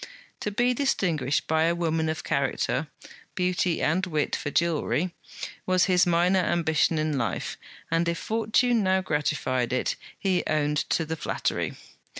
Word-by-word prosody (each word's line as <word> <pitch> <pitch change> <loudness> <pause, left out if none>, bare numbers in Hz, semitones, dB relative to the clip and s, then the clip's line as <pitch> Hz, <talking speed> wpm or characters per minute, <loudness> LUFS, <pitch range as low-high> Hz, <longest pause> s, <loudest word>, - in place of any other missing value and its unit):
To - - -2
be 245 +4 +2
distinguished 170 - 0
by 160 0 +2
a 170 +1 +2
woman 160 -2 0
of 160 0 -3
character 140 +1 0 0.5
(beauty 180 -1 0
and 175 +5 +2
wit 155 -5 0
for - - -3
jewellery), 170 +2 0 0.5
was 185 -1 +4
his 180 -2 +3
minor 175 +2 +3
ambition 165 -2 +2
in 155 -2 0
life, 115 -5 -2 0.4
and 165 +1 +2
if 170 - -1
Fortune 225 +2 +1
now 190 -1 +2
gratified 145 -6 0
it, 130 - 0 0.2
he 190 -2 +1
owned 150 -1 +1
to 165 - +1
the 160 +1 -3
flattery. - - -2
170 Hz, 150 wpm, -26 LUFS, 155-185 Hz, 0.5 s, was